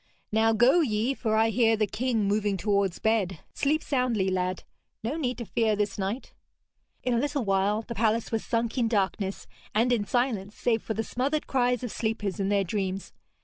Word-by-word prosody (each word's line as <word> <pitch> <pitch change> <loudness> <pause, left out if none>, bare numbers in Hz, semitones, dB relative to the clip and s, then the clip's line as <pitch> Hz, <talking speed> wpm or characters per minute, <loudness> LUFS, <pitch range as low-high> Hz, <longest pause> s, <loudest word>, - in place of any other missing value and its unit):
'Now 220 +1 +3
go 240 +9 +5
ye, 230 -2 +1
for 220 -5 -1
I 220 +1 +4
hear 225 0 +3
the 215 - +2
king 225 +2 -1
moving 205 -1 +1
towards 200 -2 +1
bed. 210 -5 +1 0.2
Sleep 305 +3 +1
soundly, 245 -8 +1
lad; 185 0 -1 0.4
no 235 +7 -2
need 255 -6 -2
to 235 - -5
fear 220 -1 +1
this 205 -1 -2
night.' 200 +7 -3 0.7
In 250 - +1
a 235 - +2
little 285 -2 -1
while 200 +3 +1
the 235 - -6
palace 225 0 +1
was 225 -1 -1
sunk 230 +2 -1
in 235 - +2
darkness, 195 -2 -1 0.3
and 240 +3 +3
in 215 -4 0
silence 225 -5 0
save 225 -2 +1
for 220 - -4
the 225 - -1
smothered 275 +7 -1
cries 250 -2 +1
of 245 - -3
sleepers 220 -3 -2
in 195 0 0
their 200 -1 +2
dreams. 190 0 -3
220 Hz, 190 wpm, -27 LUFS, 205-245 Hz, 0.7 s, go